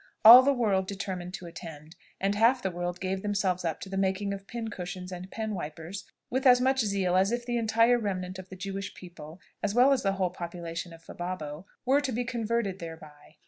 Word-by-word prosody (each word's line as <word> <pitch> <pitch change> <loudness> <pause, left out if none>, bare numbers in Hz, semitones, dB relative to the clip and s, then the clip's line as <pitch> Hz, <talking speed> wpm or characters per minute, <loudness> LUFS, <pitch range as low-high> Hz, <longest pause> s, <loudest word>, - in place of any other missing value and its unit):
All 240 +3 +13
the 275 +2 +3
world 205 -8 +1
determined 190 -2 -5
to 180 - -9
attend; 165 -2 -10 0.2
and 195 +1 +1
half 235 +5 +3
the 190 - -1
world 175 0 -4
gave 190 0 -2
themselves 195 -3 0
up 165 -2 -2
to - - -6
the 195 - -4
making 195 +1 0
of 195 0 -8
pincushions 190 -5 -6
and 180 +1 -7
pen 220 0 -4
wipers 170 +2 -6 0.3
with 260 +2 +2
as 250 -1 +7
much 265 +1 +2
zeal 200 -5 +1
as 190 +3 +3
if 240 0 -2
the 240 -1 -1
entire 230 +2 +3
remnant 185 -3 -3
of 185 0 -10
the 190 - -8
Jewish 195 +1 -5
people, 170 -2 -11 0.2
as 210 +1 -1
well 255 +3 +6
as 270 - 0
the 195 -1 +1
whole 185 -2 0
population 170 -1 -6
of 165 0 -14
Fababo, 175 -2 -6 0.2
were 275 +3 +4
to 275 -2 -2
be 245 +1 -1
converted 230 -5 -2
thereby. 155 -3 -11
190 Hz, 210 wpm, -28 LUFS, 175-225 Hz, 0.3 s, All